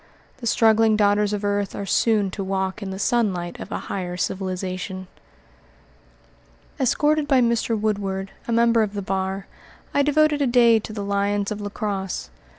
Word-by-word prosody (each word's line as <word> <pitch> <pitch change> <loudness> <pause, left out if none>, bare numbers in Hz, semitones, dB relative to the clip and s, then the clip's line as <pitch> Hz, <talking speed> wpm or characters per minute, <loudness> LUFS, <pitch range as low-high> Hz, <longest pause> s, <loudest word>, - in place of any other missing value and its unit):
The 240 -3 -5
struggling 220 -1 +4
daughters 205 0 +3
of 205 0 -2
earth 205 -1 -1
are 200 - -4
soon 205 0 +2
to 195 - -4
walk 190 +1 -2
in 200 - -4
the 190 - -5
sunlight 195 -7 0
of - - -8
a - - -1
higher 180 -2 -4
civilization. 185 0 -3 1.7
Escorted 295 +3 +2
by 270 -3 +4
Mr. 235 -2 +1
Woodward, 195 -2 -2 0.2
a - - -2
member 230 0 +4
of 210 -1 -1
the 200 - -3
bar, 190 +1 -2 0.5
I 285 - +3
devoted 295 +1 +3
a 280 - +3
day 235 -2 +5
to 215 - -8
the 210 -2 -4
lions 200 0 0
of 210 0 -4
La 205 - -4
Crosse. 200 -3 -4
205 Hz, 165 wpm, -23 LUFS, 195-230 Hz, 1.7 s, day